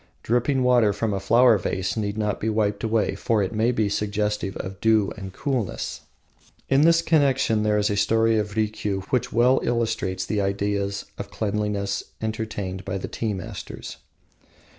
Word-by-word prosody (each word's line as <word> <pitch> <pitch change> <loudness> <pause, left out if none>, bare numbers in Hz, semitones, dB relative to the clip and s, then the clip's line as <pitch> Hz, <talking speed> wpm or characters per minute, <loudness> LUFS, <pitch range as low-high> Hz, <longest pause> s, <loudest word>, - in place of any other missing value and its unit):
Dripping 125 +3 +1
water 120 -5 +4
from 105 +1 -1
a 100 - -1
flower 115 +2 +5
vase 95 +1 -2
need 105 -1 -2
not 105 -2 -1
be 110 - -1
wiped 105 -2 0
away, 110 -1 +1
for 110 -4 0
it 95 - -3
may 110 +3 +2
be 110 -4 +1
suggestive 105 -1 -1
of 95 0 -7
dew 110 -3 +3
and 95 -1 -7
coolness. 125 -1 -3 0.7
In 135 +1 +4
this 165 +1 +5
connection 135 -8 +2
there 105 0 +2
is 105 0 +1
a - - 0
story 115 +2 +3
of 105 -1 -3
Rikiu 105 -2 -1
which 125 -1 0
well 125 +3 +4
illustrates 110 -6 -1
the 105 +2 -1
ideas 100 0 -1
of - - -5
cleanliness 105 -1 -2 0.2
entertained 110 -4 -4
by 95 0 -3
the 95 - -5
tea 110 -3 -3
masters. 95 - -7
105 Hz, 165 wpm, -24 LUFS, 100-115 Hz, 0.7 s, flower